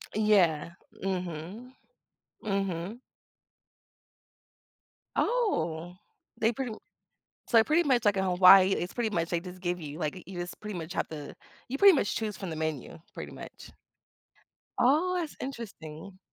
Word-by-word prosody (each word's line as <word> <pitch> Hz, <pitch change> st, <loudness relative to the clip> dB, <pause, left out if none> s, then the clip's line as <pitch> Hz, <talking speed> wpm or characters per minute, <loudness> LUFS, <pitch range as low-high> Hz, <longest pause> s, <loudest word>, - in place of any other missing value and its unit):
Yeah. 185 Hz, -7 st, +3 dB, 0.3 s
Mhm. 185 Hz, +6 st, -4 dB, 0.7 s
Mhm. 195 Hz, +1 st, -2 dB, 2.2 s
Oh, 175 Hz, -, 0 dB, 0.4 s
they 225 Hz, +1 st, +3 dB
pretty 245 Hz, -1 st, -4 dB
m -, -, -7 dB, 0.7 s
so 235 Hz, -, +4 dB
they 220 Hz, -, +8 dB
pretty 315 Hz, +6 st, +3 dB
much 245 Hz, -4 st, +3 dB
like, 205 Hz, -1 st, +4 dB
in 190 Hz, -, +1 dB
Hawaii, 185 Hz, +1 st, +7 dB
it's 180 Hz, -, -3 dB
pretty 235 Hz, -2 st, 0 dB
much 170 Hz, -5 st, -1 dB
they 170 Hz, -, +1 dB
just 180 Hz, +1 st, -10 dB
give 180 Hz, -1 st, -2 dB
you, 150 Hz, 0 st, -7 dB
like, 160 Hz, +2 st, -3 dB
you 190 Hz, -1 st, -8 dB
just 175 Hz, 0 st, -6 dB
pretty 210 Hz, -3 st, -6 dB
much 165 Hz, +1 st, -6 dB
have -, -, -1 dB
the 150 Hz, -2 st, -8 dB, 0.3 s
you 265 Hz, -, -3 dB
pretty 395 Hz, -4 st, +8 dB
much 205 Hz, -, 0 dB
choose 215 Hz, -4 st, -3 dB
from 180 Hz, -3 st, -5 dB
the -, -, -4 dB
menu, 155 Hz, -2 st, -4 dB, 0.2 s
pretty -, -, -7 dB
much. -, -, -11 dB, 1.1 s
Oh, 325 Hz, +9 st, +3 dB
that's 320 Hz, -3 st, -4 dB
interesting. 195 Hz, -, -8 dB
190 Hz, 145 wpm, -29 LUFS, 170-230 Hz, 2.2 s, they